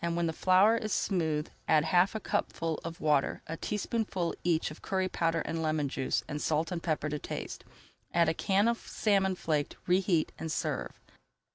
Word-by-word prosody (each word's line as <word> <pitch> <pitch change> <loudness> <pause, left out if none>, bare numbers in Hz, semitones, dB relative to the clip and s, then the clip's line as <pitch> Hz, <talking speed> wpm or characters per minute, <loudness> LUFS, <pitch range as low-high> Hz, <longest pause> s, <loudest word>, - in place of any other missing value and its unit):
When 170 0 0
the 165 - -1
flour 190 +7 +5
is 215 -1 -3
smooth, 160 -6 0 0.2
add 155 -1 +5
half 180 +5 +3
a - - -1
cupful 165 -5 -2
of 165 +1 -6
water, 150 -3 +1
a 160 - -4
teaspoonful 205 -2 -2
each 165 -3 +1
of 155 - -11
curry 190 -1 0
powder 165 -2 0
and 165 +1 -3
lemon 155 -3 0
juice, 130 - -1
and 150 0 -4
salt 160 +3 0
and 175 -2 -2
pepper 155 -2 -1
to 150 0 -3
taste. - - -6 0.5
Add 170 -1 +3
a 160 - +2
can 195 +6 +2
of 235 0 +1
salmon 195 -3 +1
flaked, 155 -4 -1
reheat, 180 -3 +2
and 160 0 -4
serve. 60 - -3
165 Hz, 180 wpm, -30 LUFS, 155-190 Hz, 0.5 s, flour